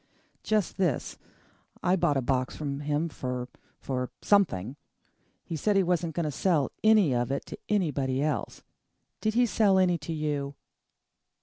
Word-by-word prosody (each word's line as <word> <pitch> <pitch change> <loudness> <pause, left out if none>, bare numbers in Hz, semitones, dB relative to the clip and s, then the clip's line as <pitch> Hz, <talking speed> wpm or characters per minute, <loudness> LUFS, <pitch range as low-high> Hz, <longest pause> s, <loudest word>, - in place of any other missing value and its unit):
"Just 215 -4 0
this. 175 -9 -1 0.6
I 180 - +3
bought 150 -6 +2
a 135 - 0
box 130 0 0
from 140 -2 -4
him 150 +2 0
for 125 -4 -4 0.3
for 125 -2 -3
something. 140 - +2 0.7
He 165 - -5
said 205 +6 +1
he 195 - +4
wasn't 170 -2 0
going 170 - 0
to 150 - -1
sell 150 -2 +1
any 215 -9 +5
of 120 +1 0
it 140 - -2
to - - -8
anybody 140 -10 0
else. 155 - -2 0.6
Did 215 0 -1
he 245 +1 +5
sell 205 -4 +3
any 180 -2 +3
to 150 +2 -6
you?" 145 -3 -2
155 Hz, 155 wpm, -28 LUFS, 135-190 Hz, 0.7 s, any